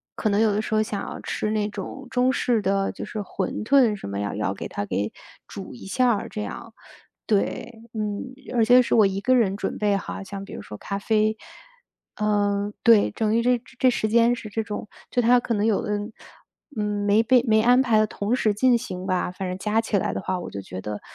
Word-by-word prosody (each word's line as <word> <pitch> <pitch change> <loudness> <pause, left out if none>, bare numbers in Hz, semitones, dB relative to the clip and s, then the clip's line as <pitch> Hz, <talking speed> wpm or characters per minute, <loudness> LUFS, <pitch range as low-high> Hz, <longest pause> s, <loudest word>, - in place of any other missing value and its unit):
可 215 - 0
能 200 +1 +2
有 220 -2 +4
的 210 - 0
时 220 - -5
候 215 - +4
想 210 -2 -3
要 - - -6
吃 215 - -2
那 210 -1 0
种 270 +5 -7
中 255 +1 +2
式 235 -3 +1
的， 195 0 0
就 - - -7
是 215 - -6
馄 195 +1 -3
饨 245 -3 +4
什 195 - -8
么 100 0 -4
要 100 0 -2
要 100 -1 -1
给 - - -6
它 100 - -4
给 100 +1 -2 0.4
煮 - - -8
一 120 - -11
下 250 +5 +2
儿 - - -4
这 210 - -5
样 - - -7 0.5
对， 225 +2 -1
嗯， 210 -2 -3 0.3
而 230 - +4
且 250 +2 +7
是 240 - +1
我 215 -3 +6
1 195 0 0
个 255 +5 +3
人 200 -5 +2
准 - - -3
备 205 -1 +2
好， 195 - -6
像 195 0 -7
比 - - -11
如 - - -6
说 105 - -9
咖 200 - -4
啡。 215 +1 +1 0.8
嗯， 205 -1 0
对， 225 -3 +5
等 220 0 0
于 235 - +3
这 245 -1 +2 0.2
这 255 - +4
时 220 -3 0
间 235 +2 +4
是 215 - -8
这 220 +1 -2
种 210 0 -6 0.2
就 245 - +2
它 245 +2 +5
可 240 -1 -1
能 210 0 +1
有 220 -3 +2
的， 210 0 -1 0.8
嗯， 210 -1 -1
没 205 +2 +4
被 245 +1 +4
没 220 -1 +4
安 245 +3 +5
排 225 -4 +3
得 215 - +3
同 205 +3 -2
时 220 -4 +2
进 245 +3 +4
行 185 -6 -6
吧， 185 -2 0
反 185 0 -5
正 185 - -4
加 215 +3 +1
起 215 -2 0
来 - - -1
的 - - -3
话 185 0 -2
我 175 - -6
就 100 - -6
觉 95 -1 -8
得 105 +1 -5
210 Hz, 250 characters per minute, -24 LUFS, 200-230 Hz, 0.8 s, 且